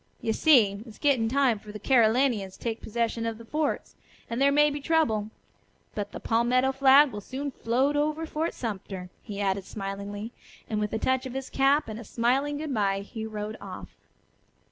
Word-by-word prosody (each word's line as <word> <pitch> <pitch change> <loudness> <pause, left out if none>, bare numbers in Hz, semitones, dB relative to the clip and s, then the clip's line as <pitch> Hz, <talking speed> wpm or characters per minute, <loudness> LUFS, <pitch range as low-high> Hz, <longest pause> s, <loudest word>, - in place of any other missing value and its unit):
You 225 - -1
see, 220 -9 +4
it's 220 - -12
getting 260 -6 +2
time 260 -4 +2
for 210 0 -9
Carolinians 225 -3 +2
to - - -16
take 230 -1 -3
possession 230 +1 -2
of 225 -1 -3
the 230 - -12
forts, 300 +4 -2 0.4
and 235 +3 -2
there 280 0 +5
may 295 +1 +4
be 290 0 -4
trouble. 235 -10 +1 0.6
But 205 -1 -4
the - - -7
palmetto 245 +3 +2
flag 270 +1 +6
will 205 -1 -6
soon 275 +6 -5
float 260 +4 0
over 305 +2 0
Fort 320 +1 -2
Sumter," 190 -5 -5
he 205 -3 -7
added 195 -1 0
smilingly, 200 +2 -5 0.4
and 215 -1 -2
with 210 -1 -1
a - - +1
touch 260 +3 0
of 255 - -8
his 270 -1 -5
cap 275 +2 +3
and 220 0 -6
a - - -8
smiling 260 +7 0
good 300 -2 -4
bye 195 -3 +1
he 220 +2 -6
rode 215 0 -5
off. - - -8
235 Hz, 190 wpm, -27 LUFS, 210-275 Hz, 0.6 s, flag